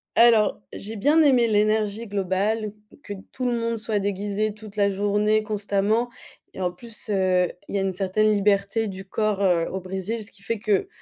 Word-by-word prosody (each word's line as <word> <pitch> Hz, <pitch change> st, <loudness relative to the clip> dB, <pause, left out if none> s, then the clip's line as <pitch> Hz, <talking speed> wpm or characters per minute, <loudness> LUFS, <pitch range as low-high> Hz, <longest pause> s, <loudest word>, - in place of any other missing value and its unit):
Alors, 225 Hz, -3 st, +5 dB
j'ai 215 Hz, +2 st, -7 dB
bien 290 Hz, +10 st, +4 dB
aimé 255 Hz, -5 st, +4 dB
l'énergie 215 Hz, 0 st, +1 dB
globale, 205 Hz, +2 st, -1 dB, 0.3 s
que 205 Hz, -, -7 dB, 0.2 s
tout 255 Hz, -, -4 dB
le 240 Hz, -1 st, +1 dB
monde 230 Hz, 0 st, -1 dB
soit 220 Hz, -1 st, -1 dB
déguisé 205 Hz, +1 st, -1 dB
toute 215 Hz, -1 st, -12 dB
la 200 Hz, -1 st, +2 dB
journée 205 Hz, +2 st, +1 dB
constamment 210 Hz, +2 st, 0 dB, 0.5 s
et -, -, -6 dB
en 180 Hz, -1 st, 0 dB
plus, 225 Hz, +4 st, -9 dB
heu, 185 Hz, -3 st, +2 dB, 0.2 s
il -, -, -8 dB
y 200 Hz, -, +1 dB
a -, -, 0 dB
une 195 Hz, 0 st, 0 dB
certaine 195 Hz, +3 st, +1 dB
liberté 205 Hz, +1 st, +1 dB
du 190 Hz, -1 st, -7 dB
corps, 210 Hz, 0 st, -1 dB
heu, 175 Hz, -4 st, +2 dB
au 190 Hz, -, -3 dB
Brésil 190 Hz, +4 st, -4 dB
ce 205 Hz, -, -7 dB
qui 200 Hz, -, -17 dB
fait 230 Hz, +1 st, -2 dB
que, 205 Hz, -2 st, +1 dB
205 Hz, 190 wpm, -24 LUFS, 195-220 Hz, 0.5 s, Alors